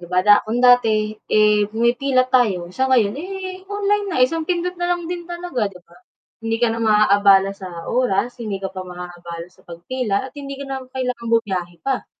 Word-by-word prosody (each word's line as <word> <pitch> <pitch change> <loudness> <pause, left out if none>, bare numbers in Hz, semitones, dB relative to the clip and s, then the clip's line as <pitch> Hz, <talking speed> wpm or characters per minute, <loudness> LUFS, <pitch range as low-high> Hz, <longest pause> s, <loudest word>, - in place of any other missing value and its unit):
'Di 175 - -10
ba 180 - +3
da 205 0 +8
kung 235 +3 -1
dati 225 -4 +4 0.2
eh, 210 -1 +3
pumipila 240 +4 +2
tayo 200 -9 +2
sa 260 +8 0
ngayon 235 -5 +3
eh, 375 +1 -7
online 410 0 0
na, 335 -10 +1
isang 320 +5 +1
pindot 355 0 0
na 350 0 +1
lang 345 -1 -7
din 345 -1 -5
talaga 345 -10 -3
'di 185 -3 -9
ba? 175 0 -22 0.4
Hindi 225 0 -2
ka 235 - +4
na 230 - -3
maabala 200 -3 +4
sa 185 -4 -8
oras, 245 -1 0
hindi 205 -4 -5
ka 190 - -3
pa 185 -1 -7
maabala 175 -1 -8
sa 185 - -26
pagpila 200 +7 -3
at - - -37
hindi 275 -1 -6
ka 280 +1 -7
na 265 -1 -5
kailangang 250 -3 -3
bumiyahe 185 -6 -1
pa. 270 -2 -2
230 Hz, 195 wpm, -20 LUFS, 195-270 Hz, 0.4 s, da